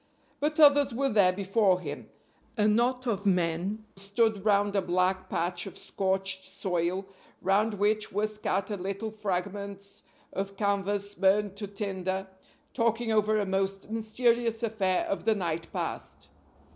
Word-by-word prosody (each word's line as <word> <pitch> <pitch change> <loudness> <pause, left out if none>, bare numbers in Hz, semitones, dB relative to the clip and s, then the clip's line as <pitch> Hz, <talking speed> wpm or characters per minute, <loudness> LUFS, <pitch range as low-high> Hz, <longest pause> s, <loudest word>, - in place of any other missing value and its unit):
But 305 +2 -1
others 285 -4 +6
were 275 +2 +1
there 200 -5 +5
before 195 0 +2
him. 145 -5 -7 0.5
A 210 -1 +3
knot 245 +4 +2
of 205 -4 -1
men 180 +4 0
stood 200 +1 0
round 205 -1 +2
a 195 - +3
black 185 +1 0
patch 175 +2 -1
of 195 - -9
scorched 190 0 0
soil, 180 0 -2 0.3
round 205 +3 +2
which 210 +1 +1
were 205 +2 +1
scattered 210 -2 -2
little 195 +4 -3
fragments 200 -1 -4 0.3
of 195 0 -4
canvas 200 0 0
burned 200 0 +2
to 205 0 -4
tinder, 190 -2 -3 0.5
talking 230 -1 +1
over 215 0 +3
a 205 - 0
most 195 +1 -1
mysterious 230 +1 +1
affair 200 -5 +1
of 200 - -3
the 220 -1 +3
night 165 -4 -3
past. - - -5
200 Hz, 140 wpm, -29 LUFS, 190-215 Hz, 0.5 s, others